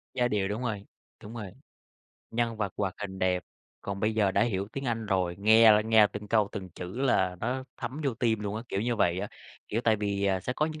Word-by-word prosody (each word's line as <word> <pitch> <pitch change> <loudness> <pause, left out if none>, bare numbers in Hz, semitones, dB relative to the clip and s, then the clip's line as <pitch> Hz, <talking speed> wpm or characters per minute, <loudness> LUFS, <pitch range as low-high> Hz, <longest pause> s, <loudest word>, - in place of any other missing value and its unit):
Giai 125 -1 +2
điệu, 100 -4 0
đúng 105 +5 -3
rồi, 105 -4 -3 0.4
đúng 105 +3 -9
rồi, 105 -5 -6 0.8
nhân 115 -1 -1
vật 100 -3 -2
hoạt 95 -2 -1
hình 95 -2 -5
đẹp. 90 -1 +1 0.4
Còn 100 0 -5
bây 110 +1 +1
giờ 105 -3 +3
đã - - +2
hiểu 100 -4 -1
tiếng 135 - -4
Anh 115 -3 -2
rồi, 90 -3 0
nghe 110 +2 +7
là 105 - +5
nghe 110 -1 +5
từng 105 0 -8
câu 105 -2 +3
từng 95 -3 -6
chữ 90 +6 -7
là 95 -9 +2
nó 130 +3 -2
thấm 130 +5 -5
vô 135 -4 0
tim 110 -2 +1
luôn 105 0 -3
á, 115 - -4
kiểu 95 - -1
như 120 +1 0
vậy 90 -3 +2
á. - - -4 0.4
Kiểu 115 - 0
tại 110 -1 +4
vì, 100 -1 -1
à, 95 -1 +1
sẽ 125 - -3
có 150 +4 0
những 155 -1 -6
105 Hz, 245 wpm, -29 LUFS, 100-115 Hz, 0.8 s, nghe